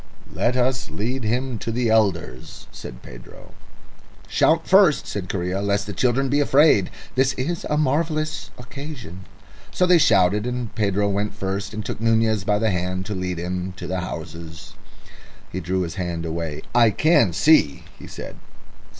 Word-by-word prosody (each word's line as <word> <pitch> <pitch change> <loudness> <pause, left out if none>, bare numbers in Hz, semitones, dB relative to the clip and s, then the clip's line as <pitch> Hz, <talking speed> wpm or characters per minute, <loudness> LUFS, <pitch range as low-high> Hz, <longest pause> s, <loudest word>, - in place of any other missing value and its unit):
"Let 125 +2 0
us 130 0 0
lead 125 +5 -3
him 120 +2 -1
to 115 - -4
the 120 0 0
elders," 95 - -1
said - - -10
Pedro. - - -13 0.7
"Shout 165 +1 +2
first," 190 -6 +5
said 95 -3 -5
Correa, 90 0 -2
"lest 100 0 0
the 105 - -6
children 125 +7 +1
be 140 +3 +1
afraid... 145 - +4 0.2
This 130 +1 +2
is 165 +7 -3
a 150 - +1
marvellous 155 -4 -1
occasion." 125 - -9 0.4
So 180 - +1
they 180 -1 +5
shouted, 105 - +3
and 125 -2 -4
Pedro 100 -1 +1
went 100 +1 -2
first 100 +2 -3
and 105 0 -6
took - - -5
Nunez 110 -2 +2
by 105 +1 +1
the 110 0 +1
hand 90 +1 -2
to 105 - -4
lead 90 -2 -3
him 90 +1 -4
to 95 - -8
the 95 0 -2
houses. 85 -1 -8 0.8
He 95 - -3
drew 95 +1 -1
his 85 -2 -3
hand 85 -2 -3
away. 80 -2 -4
"I 120 -1 +6
can 145 - +3
see," 85 - +3 0.2
he - - -10
said. - - -9
105 Hz, 165 wpm, -22 LUFS, 90-130 Hz, 0.8 s, I